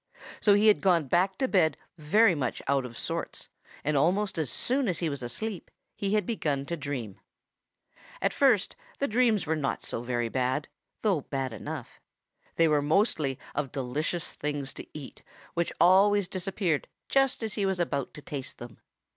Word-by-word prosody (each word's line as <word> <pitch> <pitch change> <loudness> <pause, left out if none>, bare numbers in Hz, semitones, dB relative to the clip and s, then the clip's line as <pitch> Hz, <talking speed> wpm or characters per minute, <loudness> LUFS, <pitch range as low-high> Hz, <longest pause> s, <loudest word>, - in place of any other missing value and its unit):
So 205 -2 +5
he 205 +1 +3
had 215 -1 +5
gone 175 -5 +3
back 185 +6 +2
to 265 - +1
bed 160 - +3 0.2
very 185 +7 +4
much 135 -6 -2
out 135 -1 +2
of 115 -1 -11
sorts - - -4 0.3
and 150 +1 0
almost 180 +6 +2
as 155 -5 0
soon 255 - 0
as 180 -4 0
he 170 - -1
was 140 -2 -4
asleep 185 - -4 0.3
he 200 +1 0
had 210 - +1
begun 150 - -1
to 170 - -3
dream. 135 - -5 1.0
At - - +1
first 250 -9 +3 0.2
the 280 - 0
dreams 225 -3 +2
were 160 +1 +1
not 145 -3 -2
so - - -3
very 120 -1 -1
bad, 130 +4 -1 0.4
though 195 -8 +2
bad 135 -3 -3
enough. 145 +3 -7 0.5
They 165 - +4
were 150 -2 +3
mostly 150 - +2 0.2
of 140 -2 -2
delicious 150 +6 -2
things 145 -2 -3
to - - -9
eat 140 -3 -10 0.3
which 170 0 0
always 195 +2 +5
disappeared 185 -4 -1 0.2
just 270 -3 +2
as 220 -2 -2
he 200 -2 0
was 190 -2 0
about 140 -6 -2
to 150 - -10
taste 140 -3 -6
them. 120 -2 -10
160 Hz, 175 wpm, -28 LUFS, 140-200 Hz, 1.0 s, So